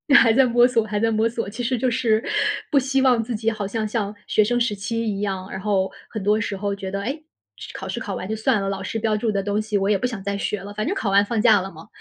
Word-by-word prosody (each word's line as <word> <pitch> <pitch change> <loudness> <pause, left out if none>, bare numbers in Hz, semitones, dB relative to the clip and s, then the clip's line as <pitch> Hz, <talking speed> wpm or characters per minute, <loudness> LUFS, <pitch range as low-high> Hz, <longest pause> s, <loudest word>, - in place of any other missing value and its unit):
还 230 -5 +7
在 265 +1 +5
摸 240 0 +5
索 230 -3 +1
还 210 -1 -2
在 225 +1 +2
摸 220 +1 +2
索， 230 -3 -4
其 225 +4 -5
实 250 +1 0
就 250 +2 +1
是， 230 -3 +1 0.5
不 285 - +5
希 270 0 +1
望 250 -4 +4
自 235 0 -4
己 225 +1 0
好 210 -3 -4
像 215 +1 -2
像 210 -2 -2
学 215 - +3
生 240 +3 +1
时 235 -3 0
期 230 +3 -3
一 200 -2 -2
样， 190 -2 -3
然 190 - -5
后 195 -2 0 0.2
很 215 -4 -5
多 210 +2 +3
时 205 -2 -3
候 200 0 -2
觉 195 -1 -6
得： 200 +1 -3
“诶， 280 +7 -4 0.5
考 - - -6
试 - - -3
考 - - -4
完 185 - -5
就 220 - -2
算 220 0 +1
了， 195 - -1
老 195 0 -3
师 225 - -3
标 220 -1 0
注 220 0 0
的 200 -1 -1
东 205 +1 0
西 215 -1 -1
我 195 0 0
也 210 - +4
不 250 - -1
想 225 -5 -6
再 200 0 -2
学 200 0 -2
了， 205 +1 -8
反 215 +1 -2
正 390 - 0
考 200 - -1
完 200 +1 +5
放 230 +1 -1
假 215 -4 +5
了 195 +1 -6
嘛！” 160 0 -13
215 Hz, 320 characters per minute, -23 LUFS, 200-235 Hz, 0.5 s, 还